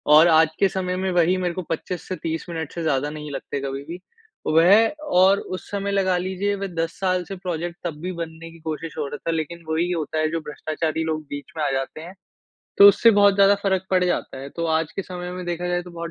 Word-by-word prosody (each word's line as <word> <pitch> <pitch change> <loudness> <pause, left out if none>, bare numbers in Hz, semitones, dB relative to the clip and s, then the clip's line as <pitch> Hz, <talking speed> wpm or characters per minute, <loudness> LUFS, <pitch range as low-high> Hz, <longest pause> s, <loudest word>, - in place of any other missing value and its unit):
और 160 +2 +8
आज 160 -1 +5
के 195 - +5
समय 185 -1 -2
में 190 - 0
वही 175 +1 +3
मेरे 180 -1 -1
को 185 - -4
25 170 +2 -4
से 185 - -2
30 165 -1 -4
मिनट 160 -3 -4
से 170 - -4
ज़्यादा 145 -2 +1
नहीं 150 -1 -7
लगते 140 0 -4
कभी 135 0 -4
भी। 175 +2 -6 0.5
वह 165 +5 +6 0.5
और 195 +2 +6 0.2
उस - - -8
समय 200 0 -2
लगा 190 -2 +2
लीजिये 190 +3 -1
वे 195 0 -4
10 165 -2 -2
साल 185 -1 +1
से 195 - -6
प्रोजेक्ट 175 -1 -4
तब 165 -3 -2
भी 180 +2 -3
बनने 165 -1 -7
की 165 - -15
कोशिश 160 0 -5
हो 145 -2 -2
रहा 145 - -6
था 165 - +2
लेकिन 165 +1 -4
वही 165 +2 +1
होता 160 -2 -2
है 155 - +1
जो 165 - -1
भ्रष्टाचारी 155 +1 -3
लोग 155 -1 -1
बीच 145 +5 -7
में 155 - -1
आ - - +1
जाते 135 +3 -3
हैं 175 +3 -9 0.7
तो 200 - +11
उससे 230 +3 +6
बहुत 200 -1 +6
ज़्यादा 200 0 +6
फ़र्क 190 -1 0
पड 185 -1 +3
जाता 135 - -2
है। 135 +1 -7
तो 170 - -1
आज 160 -1 -4
के 195 - -1
समय 180 -1 -6
में 180 0 -6
देखा 175 +1 -2
जाये 175 0 0
तो 180 - -11
बहुत 170 -1 -6
170 Hz, 245 wpm, -23 LUFS, 160-185 Hz, 0.7 s, तो